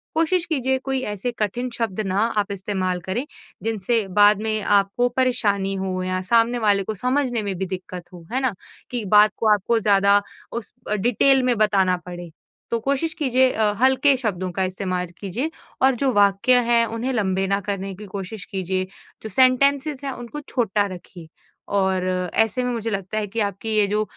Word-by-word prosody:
कोशिश 330 +2 +2
कीजिए 265 -5 0
कोई 270 -1 -1
ऐसे 205 +5 -3
कठिन 230 +4 -1
शब्द 220 -4 -2
ना 190 +1 0 0.2
आप 205 -1 0
इस्तेमाल 185 -2 -2
करें 230 +9 -2 0.4
जिनसे 220 0 0
बाद 205 0 +6
में 215 -1 -1
आपको 200 +5 +2
परेशानी 205 -6 +1
हो 190 -1 -3
या 185 0 -1
सामने 235 +1 +3
वाले 200 -3 +2
को 220 - -3
समझने 250 +1 0
में 200 -2 -3
भी 190 - -2
दिक्कत 180 -1 -6
हो, 175 -2 -12
है 260 - +1
ना? 260 -4 0 0.4
कि 245 -2 -2
बात 210 +2 +6
को 225 - 0
आपको 220 +3 +1
ज़्यादा 200 -1 +4 0.3
उस 235 -2 -6 0.3
डिटेल 255 +4 +3
में 250 -1 +2
बताना 195 -4 +3
पड़े। 175 -1 -8 0.4
तो 230 - +1
कोशिश 280 +7 -1
कीजिए 260 -4 +2
अ, 215 -1 +1
हल्के 265 +2 +4
शब्दों 190 -7 -2
का 190 +2 -1
इस्तेमाल 185 -1 -3
कीजिए। 225 - -3 0.3
और 265 -1 +4
जो 265 +2 +1
वाक्य 205 +5 +4
है 235 -1 +5
उन्हें 250 +3 -2
लंबे 195 -4 0
ना 200 +1 +1
करने 195 0 -4
की 210 - -10
कोशिश 195 +1 -7
कीजिए। 185 0 -2 0.4
जो 220 - -5
सेंटेंसेस 270 +4 +3
हैं 275 - -2
उनको 245 +4 -7
छोटा 210 -4 +1
रखिए। 175 -1 -13 0.5
और 190 -2 +1 0.3
ऐसे 225 +3 +2
में 250 - -1
मुझे 230 -1 -3
लगता 195 +1 -3
है 210 -1 -1
कि 220 +4 -4
आपकी 200 +1 -3
ये 210 - +5
जो 210 +1 0
210 Hz, 180 wpm, -22 LUFS, 195-250 Hz, 0.5 s, बाद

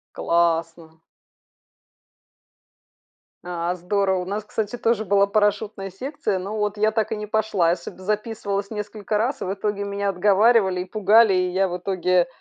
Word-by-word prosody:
Классно! 165 -1 0 2.5
А, 175 0 -2
здорово! 190 +1 0
У - - -4
нас, 205 +3 -3
кстати, 210 +2 -4
тоже 225 -1 +1
была 200 0 +3
парашютная 205 -1 0
секция, 230 0 -3
но 200 +4 -5
вот 210 0 -2
я 215 +1 +3
так 220 0 -1
и - - -1
не 210 0 -5
пошла. 210 -5 +1
Я 170 - +2
сюда 175 +2 -11
записывалась 210 0 -2
несколько 210 0 -3
раз, 250 +5 -1
и - - -1
в 185 - -2
итоге 200 0 -2
меня 200 0 -2
отговаривали 195 0 +3
и - - -3
пугали, 215 +1 +4
и 185 0 +1
я 190 +1 +1
в 180 - -3
итоге 180 -1 +1
200 Hz, 160 wpm, -23 LUFS, 180-210 Hz, 2.5 s, пугали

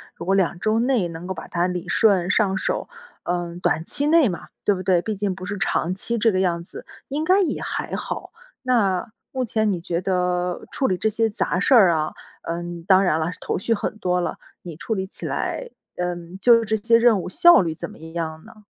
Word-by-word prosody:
如 - - -8
果 195 +2 +2
2 180 -3 +1
周 215 +3 +1
内 240 -6 +1
能 165 +1 -8
够 190 - -2
把 - - -9
它 175 +1 0
理 180 -1 -4
顺 190 -5 +3
上 195 -2 +2
手， - - -2 0.3
呃， 175 -1 -3
短 160 - +1
期 285 +10 0
内 320 -3 +5
嘛， 175 -5 -5 0.2
对 205 - +3
不 185 - -6
对？ 180 -2 +3
毕 215 +3 -3
竟 200 -1 -1
不 185 0 -8
是 205 +2 -4
长 185 -2 0
期 235 +5 -1
这 225 0 +3
个 185 - 0
样 170 -3 0
子， - - -10 0.2
应 290 +3 -2
该 375 +4 +4
也 365 - -1
还 - - -3
好。 - - -5 0.3
那 220 -5 +1 0.2
目 260 -1 -2
前 220 -1 +1
你 180 - -2
觉 170 0 -3
得 180 -1 -1
处 265 - 0
理 185 - 0
这 220 - +1
些 225 +1 +1
杂 190 -4 -1
事 200 - +3
儿 205 -8 +7
啊， 155 -1 -1 0.3
呃， 170 +1 -3 0.3
当 190 0 +6
然 160 -4 +2
了， 160 - -1
头 - - -2
绪 230 +4 0
很 215 0 -3
多 180 0 0
了， 175 - -3 0.3
你 170 -3 -8
处 220 +8 -3
理 190 -1 -2
起 - - -8
来， - - -3 0.3
嗯， 175 0 -4
就 230 +1 +5
这 220 - 0
些 230 +2 +3
任 230 -4 +4
务 - - -6
效 345 - +6
率 165 -3 -2
怎 - - -6
么 - - -13
样 160 -1 -5
呢？ 215 -1 -16
190 Hz, 240 characters per minute, -23 LUFS, 175-225 Hz, 0.3 s, 儿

